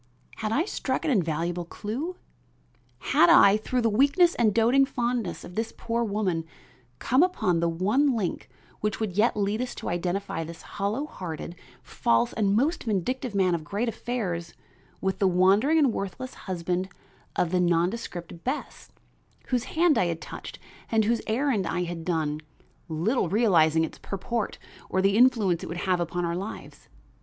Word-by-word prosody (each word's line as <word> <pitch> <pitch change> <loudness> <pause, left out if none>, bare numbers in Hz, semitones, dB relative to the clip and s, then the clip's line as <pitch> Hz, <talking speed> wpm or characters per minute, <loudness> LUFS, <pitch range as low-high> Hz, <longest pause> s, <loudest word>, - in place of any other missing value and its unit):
Had 215 -1 -2
I 295 +9 +2
struck 260 -9 -2
an 310 - +2
invaluable 175 - 0
clue? 235 - -5 1.0
Had 170 - +6
I, 200 +1 +7
through 245 +3 -1
the 230 - +2
weakness 285 - +4
and 225 -3 +2
doting 235 +6 +4
fondness 235 - -2
of 175 - -10
this 225 +3 -2
poor 235 0 -1
woman, 200 -6 -1 0.5
come 255 +4 +2
upon 260 - +2
the 170 0 +1
one 215 - +2
link 195 -6 -3 0.3
which 210 -1 -2
would 215 -4 -2
yet 215 +2 +2
lead 205 +2 0
us 250 - -4
to - - -5
identify 175 0 -2
this 165 +1 -9
hollow 210 +8 -2
hearted, 170 - -7 0.3
false 115 -2 +1
and 200 -2 +1
most 280 +8 +1
vindictive 230 +3 -2
man 185 -2 +3
of 165 -2 -2
great 205 +10 -2
affairs 190 -8 -3 0.5
with 190 0 -1
the 195 - +4
wandering 195 - +4
and 280 -7 +4
worthless 200 +7 -5
husband 180 0 -3 0.5
of 170 - +1
the 180 - +2
nondescript 175 0 -1
Bess, 265 +4 -4 0.6
whose 250 -2 0
hand 330 -1 +3
I 180 - +2
had 165 -1 -2
touched - - -8 0.3
and 220 -2 +3
whose 230 +1 +1
errand 225 -4 +1
I 180 +2 -1
had 170 -1 -5
done, 155 -3 -1 0.5
little 175 +6 0
realizing 165 -7 +4
its 160 - -5
purport 215 +3 -3 0.3
or 190 - 0
the 195 +1 +3
influence 220 -8 +4
it - - -5
would 170 - -5
have 185 -2 +2
upon 175 +1 -2
our 170 0 -1
lives? 195 +5 -7
200 Hz, 165 wpm, -26 LUFS, 175-240 Hz, 1.0 s, I